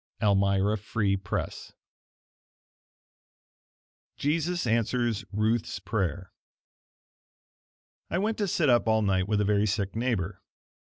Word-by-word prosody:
Elmira 100 0 +2
Free 100 -1 0
Press 95 -1 -4 2.4
Jesus 165 +3 0
Answers 115 -1 0
Ruth's 110 +3 0
Prayer 95 -3 -3 1.8
I - - -1
went 215 +3 -1
to 205 - +1
sit 165 -3 +1
up 120 -3 +4
all 110 -1 +3
night 95 -2 +1
with 105 -1 +1
a - - +1
very 105 +1 +2
sick 100 -1 -1
neighbor. 110 -6 -1
110 Hz, 105 wpm, -28 LUFS, 100-120 Hz, 2.4 s, up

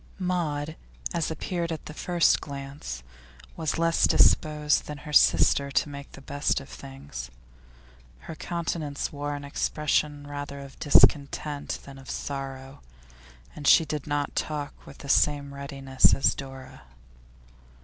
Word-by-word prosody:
Maud, 160 -5 -1 0.4
as 170 -2 0
appeared 170 +1 -3
at 160 - -5
the 150 - -7
first 175 +1 +3
glance, 135 - -7 0.5
was 160 -1 -1
less 165 0 +3
disposed 150 -1 +3
than 150 - -5
her 150 - -7
sister 140 -1 +5
to 145 - +1
make 140 0 -9
the - - -11
best 145 +2 0
of - - -12
things; 65 -2 -8 0.9
her - - -7
countenance 160 -2 -3
wore 145 0 -3
an 145 - -7
expression 145 0 0
rather 145 0 -6
of 140 -1 -11
discontent 145 0 +3
than 135 -1 -11
of 135 - -12
sorrow, 135 -1 -5 0.7
and 145 -2 -4
she 165 - +7
did 150 -1 -4
not 145 -1 -1
talk 145 -2 -2
with 140 - -11
the 140 - -10
same 140 0 +2
readiness 135 -1 +2
as - - +3
Dora. 135 -1 -9
145 Hz, 140 wpm, -27 LUFS, 140-150 Hz, 0.9 s, she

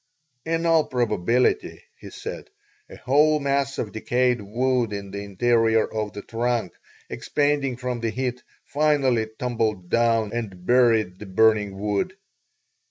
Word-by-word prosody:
"In 165 +1 -1
all 165 -2 +4
probability," 125 - 0 0.2
he - - -10
said, - - -8 0.4
"a - - -10
whole 150 +4 +3
mass 140 -1 -1
of 105 - -3
decayed 125 +1 0
wood 120 +2 0
in 100 -1 -6
the 100 - -5
interior 115 +2 +2
of 105 -2 -4
the 100 - -7
trunk, 115 -4 -2 0.3
expanding 145 -3 -1
from 125 -1 -3
the 115 -1 -1
heat, 125 +1 -3 0.2
finally 140 -6 +1
tumbled 110 -7 -2
down 115 -2 +2
and 100 -7 -5
buried 115 -6 +3
the 105 - -9
burning 105 0 +2
wood. 105 - -2
120 Hz, 135 wpm, -24 LUFS, 105-130 Hz, 0.4 s, all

